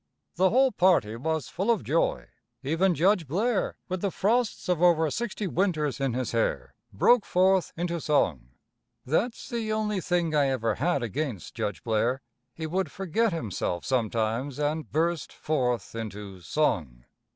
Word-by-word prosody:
The 185 +2 +3
whole 260 +4 +4
party 170 - +3
was 160 +5 -2
full 195 +6 -3
of 230 - +2
joy. - - 0 0.4
Even 165 +6 +2
Judge 180 +1 +2
Blair, 205 - 0
with 185 -1 -3
the 200 - +1
frosts 220 +5 0
of 180 -2 +1
over 160 -3 +4
sixty 230 -3 -3
winters 160 - 0
in 135 -3 0
his 130 -2 -2
hair, 115 -1 -1 0.2
broke 225 - +4
forth 185 0 +2
into 170 -1 -2
song. 80 - +1 0.6
That's 215 - -1
the 230 -4 -3
only 210 -2 0
thing 175 -3 0
I 145 -2 +3
ever 115 -4 0
had 140 +2 0
against 120 - -4
Judge 100 - -3
Blair. 120 +3 0 0.3
He 160 - -5
would 185 +4 -1
forget 195 +4 0
himself 105 - -3
sometimes 115 +2 -1
and 150 +1 -2
burst 165 +1 0
forth 125 -6 -1
into 105 -4 -6
song. 80 - -1
160 Hz, 150 wpm, -27 LUFS, 120-190 Hz, 0.6 s, whole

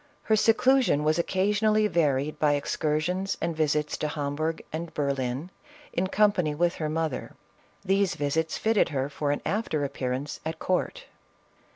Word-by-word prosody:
Her 220 - +3
seclu 250 +5 +4
sion 150 - +1
was 155 +2 +2
occasionally 210 +4 +2
varied 150 -6 +1
by 150 -1 +3
excursions 155 +7 -1
and 170 - -2
visits 150 -1 0
to 150 - -1
Hamburgh 150 +2 -2
and 165 +1 -4
Berlin, 140 +2 -2 0.4
in 185 +2 0
company 190 -7 +2
with 170 +2 +2
her 155 -1 -2
mother; 155 -4 -2 0.5
these 195 -1 +2
visits 155 +3 -1
fitted 220 -4 +2
her 135 -2 -2
for 145 0 -2
an 145 - 0
after 195 -8 -1
appearance 130 +1 -3
at 160 0 -4
court. 185 - -1
160 Hz, 150 wpm, -27 LUFS, 145-190 Hz, 0.5 s, seclu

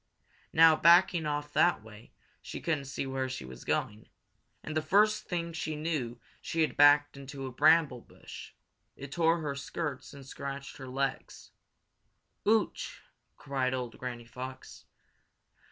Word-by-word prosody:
Now, 160 0 +7
backing 170 -1 +5
off 145 0 -3
that 175 -11 +3
way, 110 0 -14 0.3
she - - -7
couldn't 155 -4 -1
see 135 0 -4
where 130 -1 -2
she 95 - -6
was 65 -1 -10
going, 105 +1 -2 0.5
and 155 - -6
the 155 - +2
first 210 +6 +3
thing 170 -1 -3
she 155 -1 -3
knew 150 -7 -3 0.2
she 165 - -2
had 155 - +1
backed 145 0 +6
into 135 0 -7
a 130 - -5
bramble 150 -1 +4
bush. - - -12 0.4
It 135 0 -9
tore 165 +1 +2
her 145 -2 -2
skirts 140 +1 -5
and 140 -2 -12
scratched 140 0 -7
her 130 - -9
legs. 135 +1 -4 1.0
"Ooch!" 220 0 0 0.3
cried 130 -2 -1
old 125 -2 -5
Granny 120 -2 -6
Fox. 130 +2 -9
140 Hz, 145 wpm, -30 LUFS, 130-160 Hz, 1.0 s, Now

